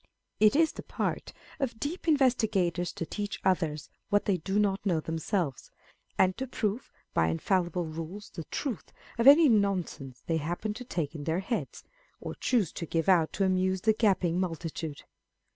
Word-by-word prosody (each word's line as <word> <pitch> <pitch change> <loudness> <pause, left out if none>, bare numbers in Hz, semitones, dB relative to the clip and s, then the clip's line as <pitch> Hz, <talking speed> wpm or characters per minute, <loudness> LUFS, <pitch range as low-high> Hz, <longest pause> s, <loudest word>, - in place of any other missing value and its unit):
It 215 +4 +5
is 320 +1 +4
the - - -8
part - - -3 0.3
of 235 -5 -2
deep 330 +4 -4
investi 260 -7 +3
gators 175 -3 0
to 165 - -4
teach 205 +4 -4
others 160 -5 +1 0.2
what 205 0 +2
they 195 -3 +2
do 190 +5 -2
not 200 -2 +1
know 180 -6 +1
themselves, 160 - -2 0.5
and 185 -1 +3
to 265 - -3
prove 225 -1 -2 0.2
by 80 - +3
infallible 175 - 0
rules 165 +6 -7
the 165 -4 -7
truth 255 - -4 0.3
of 230 - +4
any 300 +3 +9
nonsense 190 - 0
they 165 - 0
happen 175 +7 -3
to 250 - -8
take 165 - -3
in 145 -3 -7
their 165 +3 0
heads, 230 +4 -4 0.4
or - - -6
choose 220 -10 +1
to 170 - -6
give 165 +2 -1
out 175 -4 +4
to 195 - +1
amuse 185 0 +1
the 220 +2 +4
gaping 190 -6 +2
multitude. 165 -4 -4
185 Hz, 175 wpm, -29 LUFS, 165-215 Hz, 0.5 s, any